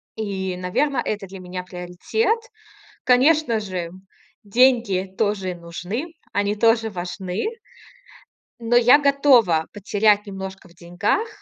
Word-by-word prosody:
И, 190 Hz, -4 st, -3 dB
наверно, 245 Hz, +9 st, 0 dB
это 205 Hz, -2 st, -3 dB
для 190 Hz, 0 st, -10 dB
меня 180 Hz, 0 st, -6 dB
приоритет. 180 Hz, -, -2 dB, 0.7 s
Конечно 255 Hz, -1 st, +3 dB
же, 185 Hz, -5 st, -5 dB, 0.5 s
деньги 205 Hz, -4 st, +2 dB
тоже 200 Hz, -4 st, -1 dB
нужны. 180 Hz, -, -6 dB, 0.2 s
Они 205 Hz, +1 st, 0 dB
тоже 225 Hz, +1 st, +2 dB
важны 180 Hz, 0 st, -4 dB, 1.1 s
но 235 Hz, +1 st, 0 dB
я 245 Hz, +3 st, +7 dB
готова 265 Hz, -, +4 dB
потерять 205 Hz, +1 st, +2 dB
немножко 190 Hz, -1 st, -8 dB
в -, -, -20 dB
деньгах 175 Hz, -, -1 dB
205 Hz, 110 wpm, -22 LUFS, 185-240 Hz, 1.1 s, я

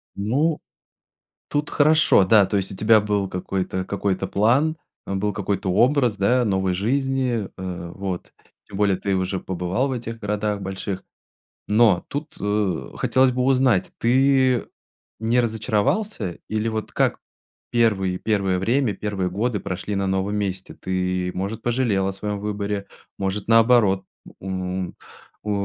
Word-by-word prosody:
Ну, 140 Hz, +11 st, +1 dB, 0.9 s
тут 145 Hz, 0 st, -1 dB
хорошо, 155 Hz, -7 st, +4 dB
да. 100 Hz, +1 st, +5 dB
То 100 Hz, +2 st, 0 dB
есть, 95 Hz, 0 st, -2 dB
у -, -, -6 dB
тебя 110 Hz, +2 st, +5 dB
был 105 Hz, -1 st, 0 dB
какой-то 95 Hz, 0 st, -3 dB
какой-то 100 Hz, -1 st, -1 dB
план, 130 Hz, +10 st, +2 dB, 0.3 s
э, -, -, -3 dB
был 105 Hz, +1 st, -1 dB
какой-то 100 Hz, -2 st, -1 dB
образ 125 Hz, +2 st, +3 dB
да, 120 Hz, +5 st, +2 dB
новой 95 Hz, -2 st, +1 dB
жизни. 125 Hz, +2 st, 0 dB
Э, 90 Hz, -2 st, -6 dB
вот. 95 Hz, -2 st, -5 dB, 0.3 s
Тем 100 Hz, -, -8 dB
более 100 Hz, -2 st, +2 dB
ты 100 Hz, 0 st, -1 dB
уже 95 Hz, 0 st, -1 dB
побывал 95 Hz, +9 st, -1 dB
в -, -, -3 dB
этих 115 Hz, -2 st, -5 dB
городах 105 Hz, -1 st, -2 dB
больших. 95 Hz, 0 st, -4 dB, 0.6 s
Но 105 Hz, -4 st, +4 dB
тут, 150 Hz, +2 st, -5 dB
э, 105 Hz, -4 st, -1 dB
хотелось 130 Hz, 0 st, +3 dB
бы 125 Hz, +1 st, 0 dB
узнать- 130 Hz, -6 st, +2 dB
ты 130 Hz, 0 st, +3 dB, 0.5 s
не 115 Hz, +3 st, +2 dB
разочаровался 110 Hz, -, -1 dB
или 110 Hz, +1 st, -1 dB
вот 110 Hz, -1 st, -4 dB
как -, -, +1 dB, 0.5 s
первые, 100 Hz, -6 st, +2 dB
первое 100 Hz, -3 st, 0 dB
время, 120 Hz, +3 st, +1 dB
первые 100 Hz, -3 st, -2 dB
годы 105 Hz, +4 st, -1 dB
прошли 95 Hz, +3 st, -4 dB
на 100 Hz, 0 st, 0 dB
новом 95 Hz, +2 st, 0 dB
месте? 95 Hz, -2 st, -3 dB
Ты, 90 Hz, -1 st, -2 dB
может, 100 Hz, +4 st, -4 dB
пожалел 115 Hz, -6 st, +1 dB
о 95 Hz, -, -2 dB
своём 105 Hz, +1 st, -4 dB
выборе, 100 Hz, -1 st, -3 dB, 0.3 s
может, 95 Hz, +1 st, -3 dB
наоборот, 115 Hz, -4 st, +4 dB, 0.4 s
м, 95 Hz, -1 st, -3 dB, 0.5 s
у 105 Hz, -, -2 dB
105 Hz, 145 wpm, -23 LUFS, 95-120 Hz, 0.9 s, да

